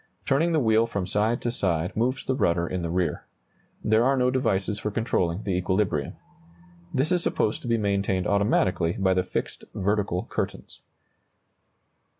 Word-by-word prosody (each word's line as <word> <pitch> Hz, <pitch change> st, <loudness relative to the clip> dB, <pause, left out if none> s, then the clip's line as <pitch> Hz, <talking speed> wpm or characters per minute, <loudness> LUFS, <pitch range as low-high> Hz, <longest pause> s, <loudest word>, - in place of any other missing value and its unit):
Turning 160 Hz, +5 st, +2 dB
the 160 Hz, -, +3 dB
wheel 110 Hz, -2 st, +3 dB
from 100 Hz, -5 st, -3 dB
side 105 Hz, +5 st, 0 dB
to 120 Hz, -, 0 dB
side 90 Hz, -4 st, -1 dB
moves 125 Hz, +4 st, 0 dB
the 130 Hz, -, 0 dB
rudder 85 Hz, -9 st, +1 dB
in 90 Hz, 0 st, -3 dB
the 85 Hz, -, -3 dB
rear. 90 Hz, 0 st, -1 dB, 0.6 s
There 110 Hz, +2 st, +3 dB
are 135 Hz, +2 st, +3 dB
no 125 Hz, 0 st, +2 dB
devices 105 Hz, -5 st, 0 dB
for 105 Hz, -, -2 dB
controlling 100 Hz, -4 st, -1 dB
the 100 Hz, -, -2 dB
equilibrium. 90 Hz, -5 st, 0 dB, 0.8 s
This 135 Hz, +6 st, 0 dB
is 180 Hz, -1 st, +3 dB
supposed 110 Hz, -9 st, 0 dB
to -, -, -7 dB
be 115 Hz, -1 st, +2 dB
maintained 100 Hz, -3 st, 0 dB
automatically 95 Hz, -4 st, +2 dB
by 95 Hz, -1 st, +1 dB
the 90 Hz, 0 st, +1 dB
fixed -, -, -4 dB
vertical 100 Hz, -2 st, 0 dB
curtains. -, -, -5 dB
100 Hz, 160 wpm, -26 LUFS, 90-115 Hz, 0.8 s, the